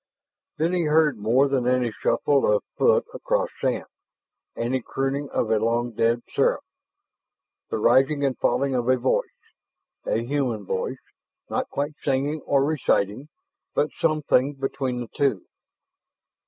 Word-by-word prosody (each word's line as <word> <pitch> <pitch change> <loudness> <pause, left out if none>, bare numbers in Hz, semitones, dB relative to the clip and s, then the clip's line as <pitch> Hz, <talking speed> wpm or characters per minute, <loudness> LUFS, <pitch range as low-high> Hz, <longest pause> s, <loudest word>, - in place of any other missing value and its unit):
Then 165 +3 +1
he 175 -2 +1
heard 150 -5 +3
more 120 +7 +3
than 130 -3 0
any 125 -2 +2
shuffle 135 +3 +1
of 105 - +2
foot - - +3
across - - -1
sand, - - -1 0.7
any 125 +2 -1
crooning 135 +3 -2
of 110 - -1
a 110 - +3
long 120 +2 0
dead 115 +1 +1
seraph, - - +1 1.1
the - - -1
rising 135 +6 +3
and 135 -2 0
falling 135 +4 +1
of 125 -1 0
a 130 - +4
voice: 130 +1 0 0.8
a 115 - 0
human 125 -6 -1
voice 95 +8 -3 0.5
not - - -1
quite 145 +2 -2
singing 145 +3 0
or 140 -1 +3
reciting, 135 -4 0 0.5
but 150 - +1
something 150 -3 +1
between 135 -2 -3
the 120 - -6
two. 130 -6 -1
130 Hz, 140 wpm, -24 LUFS, 120-140 Hz, 1.1 s, a